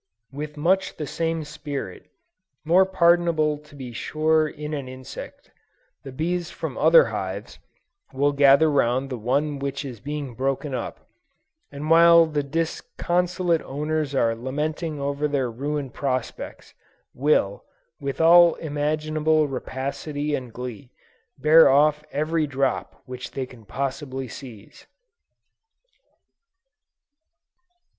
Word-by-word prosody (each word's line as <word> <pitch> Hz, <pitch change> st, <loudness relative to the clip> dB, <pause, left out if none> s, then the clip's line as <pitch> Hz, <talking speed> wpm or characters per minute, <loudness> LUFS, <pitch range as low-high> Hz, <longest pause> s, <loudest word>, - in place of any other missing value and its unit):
With 150 Hz, +2 st, -7 dB
much 185 Hz, +5 st, +1 dB
the 150 Hz, -, -3 dB
same 165 Hz, +2 st, -2 dB
spirit, 145 Hz, -1 st, -7 dB, 0.6 s
more 180 Hz, +4 st, +5 dB
pardonable 170 Hz, -4 st, +3 dB
to 150 Hz, -1 st, -18 dB
be 130 Hz, -4 st, -8 dB
sure 155 Hz, +5 st, +1 dB
in 150 Hz, 0 st, -7 dB
an 140 Hz, -3 st, -4 dB
insect, 130 Hz, 0 st, -10 dB, 0.5 s
the 135 Hz, -, -9 dB
bees 170 Hz, +5 st, -2 dB
from -, -, -6 dB
other -, -, +6 dB
hives, -, -, -5 dB, 0.5 s
will 140 Hz, +2 st, +1 dB
gather 140 Hz, +2 st, +5 dB
round 130 Hz, 0 st, +1 dB
the 125 Hz, -, -3 dB
one 140 Hz, +5 st, 0 dB
which 140 Hz, +1 st, -3 dB
is 125 Hz, -5 st, -7 dB
being 145 Hz, +1 st, -5 dB
broken 135 Hz, +3 st, -2 dB
up, 125 Hz, -, -5 dB, 0.6 s
and 145 Hz, +2 st, -6 dB
while 170 Hz, 0 st, +7 dB
the 150 Hz, -2 st, -1 dB
disconsolate 170 Hz, +3 st, -1 dB
owners 150 Hz, 0 st, -2 dB
are 115 Hz, -3 st, +2 dB
lamenting 150 Hz, +5 st, -3 dB
over 140 Hz, +1 st, -1 dB
their 135 Hz, -4 st, -1 dB
ruined 140 Hz, +2 st, -4 dB
prospects, 130 Hz, -4 st, -4 dB, 0.4 s
will, 125 Hz, -8 st, +1 dB, 0.4 s
with 140 Hz, -1 st, -4 dB
all 170 Hz, +1 st, +7 dB
imaginable 155 Hz, +1 st, 0 dB
rapacity 140 Hz, +3 st, -4 dB
and 125 Hz, -4 st, -3 dB
glee, 125 Hz, +2 st, -7 dB, 0.5 s
bear 155 Hz, +4 st, +7 dB
off 150 Hz, +2 st, +4 dB
every 155 Hz, +2 st, 0 dB
drop 135 Hz, -2 st, -2 dB
which 130 Hz, -1 st, -7 dB
they 135 Hz, -, -4 dB
can 125 Hz, -3 st, -16 dB
possibly 135 Hz, +2 st, -4 dB
seize. 115 Hz, -4 st, -12 dB
145 Hz, 120 wpm, -24 LUFS, 135-155 Hz, 0.6 s, while